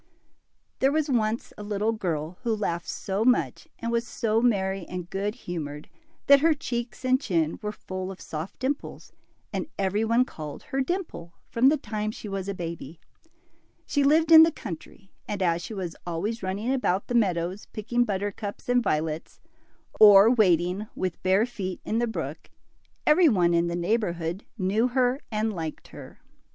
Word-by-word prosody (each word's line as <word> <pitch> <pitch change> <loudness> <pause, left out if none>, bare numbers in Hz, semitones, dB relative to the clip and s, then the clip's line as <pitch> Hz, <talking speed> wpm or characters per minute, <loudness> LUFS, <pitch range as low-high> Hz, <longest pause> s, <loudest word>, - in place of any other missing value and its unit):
T 265 - +4
HEEE - - +4
was 305 -1 0
once 225 -1 0
a - - -6
little 210 +1 0
girl 170 -6 -3
who 235 -3 0
laughed 175 -5 -3
so 195 +2 -2
much 250 +1 +1
and 230 0 -3
was 235 0 0
so 225 0 0
merry 195 -5 +1
and 180 -1 -6
good 205 +3 -2
humored, 150 - -6 0.4
that 280 0 +7
her 320 +2 +4
cheeks 240 -5 -5
and 255 +1 +3
chin 165 - 0
were 210 - -3
full 185 -2 -6
of 190 - -10
soft 160 +4 -6
dimples, 275 +3 -4 0.4
and - - -2
every 200 +2 0
one 230 +3 +3
called 155 - -8
her 270 - -2
Dimple 260 - -4 0.2
from 250 +3 +5
the 305 - +2
time 215 -4 -3
she 215 - -7
was 195 -1 -4
a 200 - -3
baby. 165 -3 -6 0.9
She 285 - +1
lived 315 +3 +4
in 320 -1 +11
the 325 +1 +6
country, 195 - -9 0.2
and 205 - -3
as 170 -1 +1
she 175 +6 -7
was 180 -4 -4
always 185 +7 -3
running 200 +7 -1
about 200 -7 0
the - - -5
meadows 185 -4 0
picking 240 +3 0
buttercups 205 -1 -4
and 245 0 +3
violets, 155 -4 -2 0.6
or 205 +1 +9
wading 185 -2 +2
with 185 -2 -3
bare 190 +4 +3
feet 195 -7 -5
in 225 - 0
the 240 - +1
brook, 225 - -5 0.6
every 320 +2 +6
one 175 -7 +3
in 170 0 +2
the 170 - -2
neighborhood 175 -2 -1
knew 210 +4 +1
her 250 +1 +1
and 215 0 0
liked 160 -4 -6
her. - - -11
210 Hz, 175 wpm, -26 LUFS, 180-240 Hz, 0.9 s, in